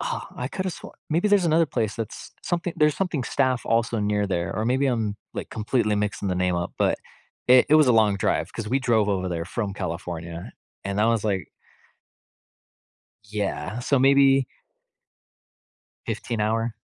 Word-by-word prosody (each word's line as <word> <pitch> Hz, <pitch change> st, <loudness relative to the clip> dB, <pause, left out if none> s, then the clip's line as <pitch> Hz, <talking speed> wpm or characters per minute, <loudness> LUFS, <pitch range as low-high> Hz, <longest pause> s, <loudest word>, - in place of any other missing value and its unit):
I 125 Hz, -, -4 dB
coulda 185 Hz, 0 st, -2 dB
swore -, -, -10 dB, 0.2 s
maybe 170 Hz, +6 st, +2 dB
there's 200 Hz, -3 st, +4 dB
another 165 Hz, +1 st, +3 dB
place 110 Hz, -7 st, -1 dB
that's 115 Hz, -3 st, -6 dB
something 175 Hz, 0 st, -2 dB
there's 150 Hz, -1 st, +3 dB
something 175 Hz, -9 st, -1 dB
staff 130 Hz, -1 st, +1 dB
also 115 Hz, 0 st, +1 dB
near 105 Hz, 0 st, 0 dB
there, 90 Hz, -2 st, -2 dB
or 110 Hz, -, -1 dB
maybe 130 Hz, +4 st, +2 dB
I'm, 110 Hz, -5 st, -1 dB, 0.2 s
like, -, -, -5 dB
completely 110 Hz, 0 st, 0 dB
mixing 105 Hz, -1 st, -2 dB
the 90 Hz, -, 0 dB
name 90 Hz, 0 st, +1 dB
up, 85 Hz, 0 st, -3 dB
but -, -, +2 dB, 0.5 s
it 125 Hz, 0 st, +7 dB
it 150 Hz, -, +5 dB
was 155 Hz, -2 st, +6 dB
a -, -, +6 dB
long 110 Hz, -3 st, +4 dB
drive -, -, 0 dB
'cause 105 Hz, -2 st, -5 dB
we 135 Hz, +3 st, +2 dB
drove 115 Hz, -5 st, +2 dB
over 95 Hz, -2 st, 0 dB
there 85 Hz, -1 st, -3 dB
from 100 Hz, +2 st, -3 dB
California, 85 Hz, -2 st, -5 dB, 0.3 s
and 100 Hz, +1 st, -1 dB
I 110 Hz, -, +4 dB
was 115 Hz, -2 st, +1 dB
like 100 Hz, -3 st, -1 dB, 1.8 s
Yeah, 105 Hz, +1 st, -3 dB
so 135 Hz, +2 st, +2 dB
maybe 135 Hz, 0 st, +5 dB, 1.6 s
15 115 Hz, -3 st, -3 dB
hour. 115 Hz, +2 st, 0 dB
110 Hz, 165 wpm, -24 LUFS, 100-135 Hz, 1.8 s, it